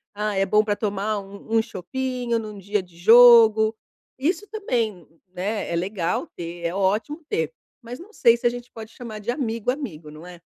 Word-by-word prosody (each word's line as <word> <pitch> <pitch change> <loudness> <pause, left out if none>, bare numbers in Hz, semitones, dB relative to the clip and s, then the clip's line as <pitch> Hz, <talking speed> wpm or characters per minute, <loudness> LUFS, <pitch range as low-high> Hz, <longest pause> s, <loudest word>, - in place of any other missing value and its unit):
"Ah, 210 -1 -2
é 195 0 +2
bom 210 +2 +4
para 205 -1 -1
tomar 205 0 -2
um 200 +3 -4
um - - +5
chopinho 240 +3 -3
num 215 -2 -8
dia 200 +1 -2
de 175 -2 -19
jogo"? 225 +1 +7 0.4
Isso 355 +9 -1
também, 230 - -2 0.3
né, 205 +4 -3
é - - -1
legal 180 -1 -2
ter. 170 0 -7
É 170 - -1
ótimo 210 - -1
ter, 475 +2 -1 0.3
mas 245 +5 -8
não 395 +6 -13
sei 235 - +4
se 240 - 0
a - - +4
gente 245 0 -8
pode 225 -1 -10
chamar 225 -3 -8
de 215 +3 -8
amigo, 230 -4 -3
amigo, 175 - -7
não 155 +3 -12
é? 180 -1 -11
215 Hz, 195 wpm, -23 LUFS, 195-240 Hz, 0.4 s, jogo